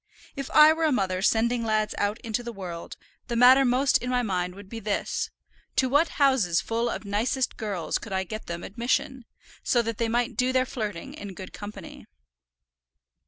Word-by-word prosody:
If 275 -1 -5
I 305 +1 +7
were 325 0 0
a 310 - +3
mother 190 -7 0
sending 230 +3 +2
lads 215 -1 0
out 205 +3 0
into 225 +1 -2
the 240 0 -6
world, 180 -5 -7 0.3
the 235 - -2
matter 255 +3 +7
most 260 +2 +3
in 250 - -4
my 250 -1 +1
mind 180 -4 -2
would 200 0 -11
be 225 +3 -7
this, 210 -1 -2 0.5
to 260 - +3
what 290 +5 +4
houses 260 - +3
full 230 +1 -1
of 220 - -5
nicest 230 +6 0
girls 200 -7 -2
could 210 - -10
I 190 0 0
get 215 +4 -7
them 170 0 -5
admission, 240 +3 -2 0.4
so 240 -1 +2
that 230 -1 -4
they 230 -1 +1
might 240 +1 0
do 250 +3 +1
their 255 0 +2
flirting 220 - -5
in 205 -10 -8
good 185 +1 -9
company. 205 -3 -9
230 Hz, 190 wpm, -26 LUFS, 200-255 Hz, 0.5 s, I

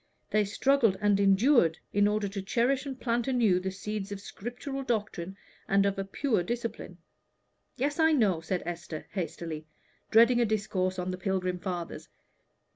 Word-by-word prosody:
They 210 -1 +3
struggled 230 -1 +2
and 205 -1 +3
endured 195 - +4 0.2
in 205 0 +4
order 210 0 0
to 195 0 -5
cherish 250 +8 +1
and 265 -2 -6
plant 235 -1 0
anew 230 -8 +3
the 190 +1 -3
seeds 200 +1 -5
of 200 - -3
a - - -14
scriptural 245 +7 -6
doctrine 210 -7 -3 0.3
and 195 0 +3
of 195 -1 0
a - - 0
pure 220 +2 0
discipline." 230 -3 -4 0.8
"Yes, 290 +4 -1
I 320 0 +5
know," 205 - +2
said 180 +2 -2
Esther, 170 -2 -6
hastily, 165 -4 -5 0.4
dreading 235 +2 +6
a - - +4
discourse 195 -3 -1
on 180 0 -2
the 185 - -5
pilgrim 185 -1 -1
fathers. 175 -2 -5
200 Hz, 165 wpm, -29 LUFS, 185-240 Hz, 0.8 s, dreading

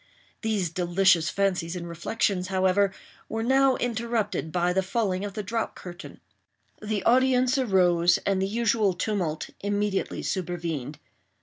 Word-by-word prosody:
These 210 -7 -1
delicious 175 -1 +3
fancies 185 -4 -1
and 170 -1 -5
reflections, 180 +2 -1
however, 190 +1 +2 0.4
were 225 +1 -2
now 265 +2 +4
interrupted 230 -7 -2
by 175 +1 +1
the 190 - +2
falling 190 -1 -1
of 205 -1 -5
the 210 - -3
drop 225 +3 -3
curtain. 175 -1 -10 0.6
The 215 -1 -2
audience 255 +1 +3
arose; 175 -7 +3
and 195 -1 +1
the 190 - +1
usual 215 -3 +1
tumult 175 -6 -2
immediately 205 -1 -1
supervened. 165 -6 -3
195 Hz, 130 wpm, -26 LUFS, 175-220 Hz, 0.6 s, now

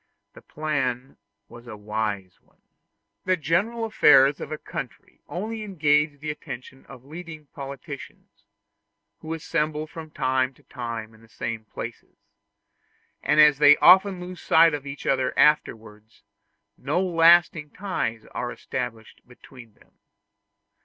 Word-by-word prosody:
The - - -14
plan 135 -4 -3 0.3
was 120 +1 -14
a 110 -3 -8
wise 105 -3 -4
one. - - -35 0.6
The 185 0 +2
general 200 +10 0
affairs 140 -10 +5
of - - -7
a 155 - -3
country - - -9
only 215 +5 -5
engage 150 -7 +1
the 150 +1 -4
attention 130 -2 -10
of 130 -2 -13
leading 155 0 -10
politicians, 140 -1 -10 0.7
who 160 +1 -5
assemble 155 -1 -2
from 155 0 -10
time 130 -2 -1
to - - -25
time 115 -3 -7
in 110 - -20
the 115 - -20
same 115 -1 -5
places; - - -9 1.0
and 150 - +1
as 150 -2 +6
they 145 0 +7
often 190 0 +6
lose 180 0 -9
sight 165 0 +5
of 145 -1 -5
each 140 +1 -8
other 130 -1 0
afterwards, 110 -7 0 0.6
no - - -1
lasting 170 -3 +4
ties 125 - -4
are - - -3
established 115 -2 -6
between 120 -2 -16
them. - - -26
145 Hz, 130 wpm, -24 LUFS, 125-165 Hz, 1.0 s, they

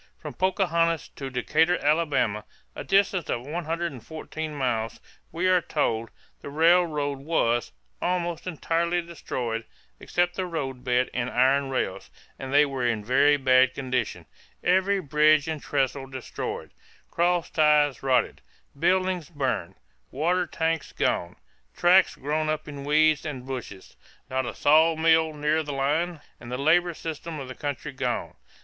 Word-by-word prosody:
From - - -8
Pocahontas 170 -4 +1
to 135 -1 -7
Decatur, 160 +7 +2
Alabama, 145 -9 +1 0.3
a - - -5
distance 195 -3 +2
of 120 +1 -2
114 160 -1 -4
miles, 120 -5 -2 0.3
we 170 +3 -2
are 185 -1 +4
told, 115 -7 -1 0.3
the - - -7
railroad 155 -3 +2
was 120 -6 0 0.3
"almost 175 -1 -2
entirely 170 +1 0
destroyed, 125 -9 -4 0.4
except 175 0 0
the 185 -1 -2
road 135 -7 -4
bed 125 0 +1
and 125 0 -1
iron 135 +2 +2
rails, 130 - -3 0.3
and 135 -1 -6
they 145 +1 +6
were 135 -3 -4
in 115 -3 0
a - - -15
very 145 +5 +4
bad 130 -1 +4
condition 130 -3 -2 0.4
every 190 +2 +3
bridge 150 -1 +3
and 155 -2 -3
trestle 135 -1 -1
destroyed, 130 -2 -6 0.4
cross 175 0 +1
ties 150 -3 +3
rotten, 130 -2 +1 0.4
buildings 185 -1 +1
burned, 130 - -2 0.3
water 175 +5 0
tanks 160 -1 -2
gone, 85 - -1 0.4
tracks 180 +2 +5
grown 155 +3 -1
up 155 0 -2
in 140 -2 -7
weeds 155 0 +3
and 135 -5 -6
bushes, 125 -8 -7 0.4
not 130 -1 -1
a - - -5
saw 160 +3 +4
mill 160 0 +3
near 150 +1 0
the 150 -2 -5
line 150 +4 -1 0.2
and 120 - -10
the 125 - -2
labor 170 +5 +2
system 160 0 -6
of 135 - -7
the 130 - -7
country 145 +1 -5
gone. 130 -3 -3
150 Hz, 145 wpm, -26 LUFS, 130-165 Hz, 0.4 s, they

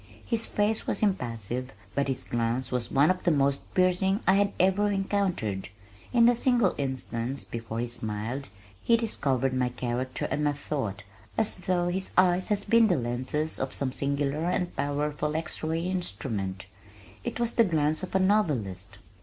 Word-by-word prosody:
His 230 -1 +2
face 210 +1 0
was - - 0
impassive 125 - -2 0.2
but 140 0 0
his 135 -2 -2
glance 120 +2 -1
was 125 -2 -1
one 140 +5 +4
of 185 0 -3
the - - +3
most 140 -3 +1
piercing 185 +2 +3
I 190 - +5
had 200 0 +3
ever 190 +3 +3
encountered. 190 - -1 0.4
In 235 -2 +5
the 240 - +6
single 240 -4 +2
instant 130 -1 -3
before 115 -1 -4
he 120 - -1
smiled 115 +2 -3 0.3
he 235 - +4
discovered 135 - 0
my 125 -1 +1
character 125 +1 -3
and 150 - 0
my 145 0 +2
thought 135 -9 -4 0.3
as 220 -1 +3
though 180 -1 0
his 190 +2 -3
eyes 180 0 +4
had 205 -2 0
been 230 -1 +6
the 180 -5 +2
lenses 130 +6 -2
of 130 - -3
some 135 -2 0
singular 140 +3 -1
and 180 0 -1
powerful 150 +1 -1
x 160 0 -3
ray 160 +1 -1
instrument. 105 - -2 0.6
It - - -4
was 235 -1 +1
the 230 - +5
glance 155 -5 +1
of 185 - -6
a - - +5
novelist. 135 - 0
150 Hz, 170 wpm, -28 LUFS, 125-190 Hz, 0.6 s, the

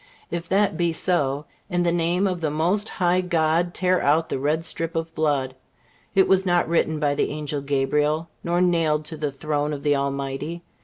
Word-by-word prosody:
If 170 0 -4
that 200 +2 +2
be 170 -2 +1
so, 150 -4 +1 0.2
in 175 0 +1
the 170 - +2
name 175 +3 +1
of 180 -3 -1
the 155 - 0
Most 175 +8 0
High 180 0 +1
God, 170 0 +1
tear 185 -1 +2
out 155 +3 +2
the - - -2
red 155 +4 0
strip 165 +1 -2
of 165 0 -3
blood; 145 -5 0 0.6
it 190 - +5
was 190 0 +4
not 175 -2 +2
written 160 -2 +1
by 145 -2 +1
the - - 0
Angel 150 -1 -3
Gabriel, 150 +3 0 0.2
nor 175 +1 +1
nailed 165 -4 +2
to 155 +1 -6
the 150 -1 -1
throne 150 +1 -2
of 140 -1 -6
the 145 -1 +3
Almighty. 140 +4 -3
160 Hz, 195 wpm, -23 LUFS, 150-175 Hz, 0.6 s, it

